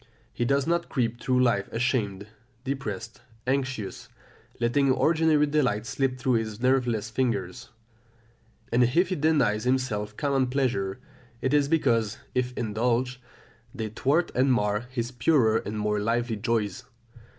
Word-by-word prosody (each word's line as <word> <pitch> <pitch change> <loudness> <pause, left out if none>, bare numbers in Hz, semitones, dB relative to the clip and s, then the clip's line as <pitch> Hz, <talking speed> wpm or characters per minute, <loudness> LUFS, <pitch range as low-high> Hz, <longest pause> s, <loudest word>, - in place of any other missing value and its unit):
He 120 - -1
does 140 +2 +2
not 170 +1 0
creep 120 -3 -1
through 125 -1 +2
life 100 -6 +1
ashamed, 110 -5 -1 0.4
depressed, 115 -6 -5 0.2
anxious, 130 -5 -2 0.5
letting 130 +3 +2
ordinary 155 +1 +3
delights 130 -7 0
slip 135 -1 -1
through 125 -2 +1
his 110 -1 -6
nerveless 120 -4 +1
fingers; 120 0 -2 1.0
and 120 +2 +4
if 170 +10 +2
he 185 - 0
denies 140 -9 +2
himself 110 -5 -1
common 135 -3 +1
pleasures, 125 -8 -1 0.4
it 130 +3 -1
is 145 -1 +4
because, 115 -9 +1 0.2
if 125 0 0
indulged, 120 +3 0 0.6
they 110 -4 -3
thwart 140 +10 +1
and 130 +1 +3
mar 105 0 0
his 120 -1 -3
purer 120 -3 +3
and 105 -1 -4
more 105 0 0
lively 115 +2 0
joys. 105 -3 -1
125 Hz, 135 wpm, -26 LUFS, 110-135 Hz, 1.0 s, and